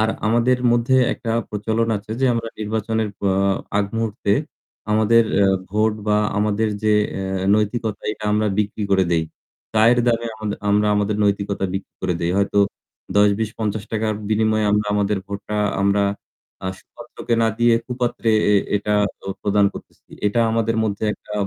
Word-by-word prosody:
আর 110 - +2 0.2
আমাদের 120 +3 +3
মধ্যে 120 +2 +2 0.2
একটা 115 - -5 0.2
প্রচলন 110 +2 -1
আছে 105 +1 -10
যে - - +3
আমরা 115 0 -2
নির্বাচনের 110 +1 -1 0.2
অ - - +3 0.5
আগ 105 - +2
মুহূর্তে 110 -2 -1 0.6
আমাদের 110 +2 +4 0.4
ভোট 105 +3 +1
এ - - -11
বা 105 0 +3 0.2
আমাদের 105 +1 +1
যে 110 0 +3 0.2
অ্যা 95 -1 -3
নৈতিকতা 110 0 -1
এটা 110 - -9
আমরা 105 +1 +2
বিক্রি 105 +1 -1
করে 95 -1 +4
দেই। 80 -2 +2 0.5
চায়ের 115 +3 +5
দামে 115 -1 +1
আমাদ 110 -1 -4 0.2
আমরা 105 +1 +3
আমাদের 105 0 0
নৈতিকতা 100 -1 0
বিক্রি 95 - -6
করে 90 -1 0
দেই। 85 - 0
হয়তো 100 +1 +1 0.6
৳১০-৳২০-৳৫০ 110 +1 0
বিনিময়ে 110 0 +2
আমরা 105 0 +1
আমাদের 105 0 +1
ভোটটা 100 +1 -5 0.3
আমরা 100 +1 +2 0.6
আ - - -2
সুপাত্রকে 120 0 -5
না 115 - +3
দিয়ে 120 0 +4
কুপাত্রে 120 -2 -1 0.2
এ - - +5 0.2
এটা 105 +1 -2 0.3
তো - - -14 0.2
প্রদান 100 0 +3
করতেছি। - - -13 0.2
এটা 105 +3 +1
আমাদের 115 0 0
মধ্যে 105 0 -2
একটা 105 - -12
105 Hz, 155 wpm, -21 LUFS, 100-115 Hz, 0.6 s, চায়ের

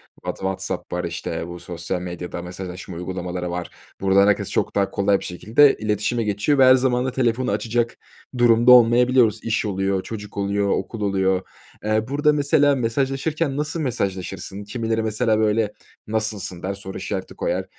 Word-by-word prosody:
What - - -5
WhatsApp 95 0 -4
var, - - -2
işte, 85 - -4
bu, 85 0 -8
sosyal 85 +1 -4
medyada 90 0 -6
mesajlaşma 90 0 -7
uygulamaları 90 0 -4
var. 90 0 -4 0.3
Buradan 100 +1 +4
herkes 105 - +1
çok - - -1
daha 100 -1 +1
kolay 100 0 +2
bir - - -10
şekilde 110 +11 +4
iletişime 110 +2 -1
geçiyor 105 +8 +1
ve 135 - +6
her 130 0 +8
zaman 125 -1 +1
da 130 - -1
telefonu 125 0 0
açacak 115 0 -1 0.4
durumda 120 +1 +5
olmayabiliyoruz. 120 -1 +5
İş 115 0 0
oluyor, 95 -1 -1
çocuk 105 -2 -8
oluyor, 100 0 0
okul 115 +2 -2
oluyor, 95 -2 +1 0.4
eee, 110 +1 0
burada 150 +2 +2
mesela 145 0 +3
mesajlaşırken 135 +4 -1
nasıl 150 +2 -2
mesajlaşırsın? 95 - -3
Kimileri 115 +1 -2
mesela, 110 0 +1
böyle, 105 -1 +1 0.3
"Nasılsın?" 105 -5 -3
der, 95 +2 -2
soru 95 -1 -8
işareti 95 0 -5
koyar, - - -2
105 Hz, 160 wpm, -22 LUFS, 95-120 Hz, 0.4 s, her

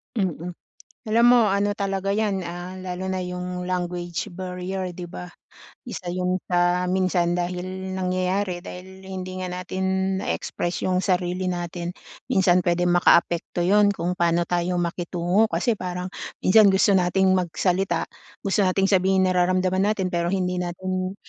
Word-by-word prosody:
Mm. 180 -4 -2 0.5
Alam 230 +2 +4
mo, 245 - +6
ano 200 +1 +1
talaga 195 -1 -1
yan, 200 -3 0
ah, 175 +2 -6
lalo 185 0 -5
na 190 - -1
yung 180 0 -4
language 175 -1 -3
barrier 185 +1 -4
'di 175 0 -7
ba? 180 - -7 0.6
Isa 180 -6 -5
yun 180 0 0
sa 175 0 +2
minsan 185 -2 +1
dahil 180 0 -2 0.3
nangyayari, 185 0 -1
dahil 190 +1 -10
hindi 185 -1 -5
nga 185 - -3
natin 190 +1 -1
na-e-express 175 -2 -3
yung 185 -1 +1
sarili 180 0 0
natin. 175 0 -4 0.3
Minsan 190 -7 +4
pwedeng 175 0 +1
makaapekto 175 0 +3
'yon, 205 +3 +5
kung 180 -1 -2
paano 170 0 +2
tayo 175 +1 -1
makitungo 175 +4 0
kasi 235 - +1
parang 180 0 -4 0.3
minsan 205 +2 +7
gusto 190 +1 +4
nating 190 0 +3
magsalita, 180 0 0 0.4
gusto 195 +1 +1
nating 195 +1 +2
sabihin 190 0 +3
nararamdaman 185 +1 +2
natin, 190 -3 -2
pero 170 0 0
hindi 180 -1 -1
natin, 185 +1 -3
185 Hz, 140 wpm, -24 LUFS, 175-190 Hz, 0.6 s, minsan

